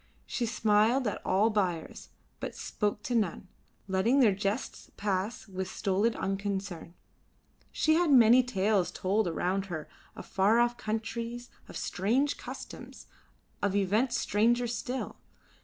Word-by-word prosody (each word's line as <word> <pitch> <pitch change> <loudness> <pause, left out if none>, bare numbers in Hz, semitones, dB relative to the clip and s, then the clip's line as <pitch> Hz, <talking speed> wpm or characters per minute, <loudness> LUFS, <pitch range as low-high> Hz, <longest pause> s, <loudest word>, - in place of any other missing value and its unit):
She 240 -2 -2
smiled 220 +3 +3
at 210 - -3
all 205 +4 +2
buyers, 180 -6 -2 0.3
but - - -5
spoke 210 0 -2
to 250 - -3
none, 205 -5 0 0.4
letting 200 +8 +2
their 225 -7 +5
jests 200 +5 -3
pass 205 +2 -2
with 190 -1 -4
stolid 205 +4 0
unconcern. 195 -3 -3 0.8
She 315 - +2
heard 340 0 +3
many 245 -2 +7
tales 205 -5 +1
told 200 +2 0
around 185 +3 -1
her 160 -4 -5 0.3
of - - -9
far 200 +4 +3
off 240 0 +2
countries, 230 +2 -4 0.2
of - - -7
strange 245 +10 0
customs, - - -9 0.6
of 200 -1 0
events 215 +6 +1
stranger 235 +4 +2
still. 245 +2 -4
210 Hz, 130 wpm, -30 LUFS, 190-235 Hz, 0.8 s, many